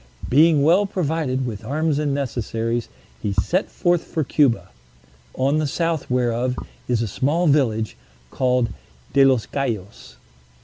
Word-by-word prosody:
Being 150 +1 +5
well 180 +7 +4
provided 155 -8 -1
with 110 -5 -5
arms 150 +1 0
and 150 -2 0
necessaries, 120 -4 -2 0.3
he 100 - -1
set 180 - 0
forth 175 -2 +1
for 160 - -2
Cuba, 135 -3 +2 0.7
on 140 +4 +1
the 155 - 0
south 165 +1 -1
whereof 125 0 0 0.3
is 120 -2 +1
a - - -2
small 150 - 0
village, 120 - +2 0.4
called 125 -2 +1 0.4
De 140 0 +6
los 130 -4 +3
Cayos. 105 - -4
135 Hz, 135 wpm, -22 LUFS, 120-155 Hz, 0.7 s, De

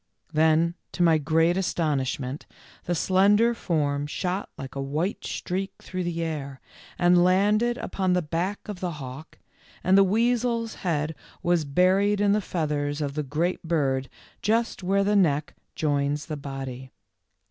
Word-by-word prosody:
Then 160 +2 +3 0.2
to 175 - +1
my 165 -2 +5
great 165 +4 +2
astonishment 145 -6 -1 0.4
the 175 - 0
slender 205 +7 +4
form 145 -9 -1
shot 185 +5 -3
like 135 0 -7
a 140 - -4
white 150 +8 -2
streak 190 +2 -3
through 185 -1 -4
the 170 -1 -2
air, 140 -4 -4 0.4
and 175 0 +5
landed 210 +6 +3
upon 185 -2 -1
the 180 -1 +1
back 175 +6 -3
of 205 -4 -6
the 180 -2 -3
hawk, 140 +1 -9 0.5
and 185 +1 +4
the 195 - +7
weasel's 230 +2 +1
head 160 -3 -1 0.3
was 175 -3 +2
buried 190 +7 +3
in 205 -1 +3
the 210 +1 +2
feathers 150 -5 -2
of 145 -2 -2
the 150 - -1
great 155 +6 -1
bird 135 -6 0 0.3
just 225 0 0
where 195 +2 +2
the 205 +1 +2
neck 150 -6 +2 0.2
joins 145 -1 0
the 155 - -4
body. 135 -2 -6
170 Hz, 150 wpm, -26 LUFS, 145-195 Hz, 0.5 s, the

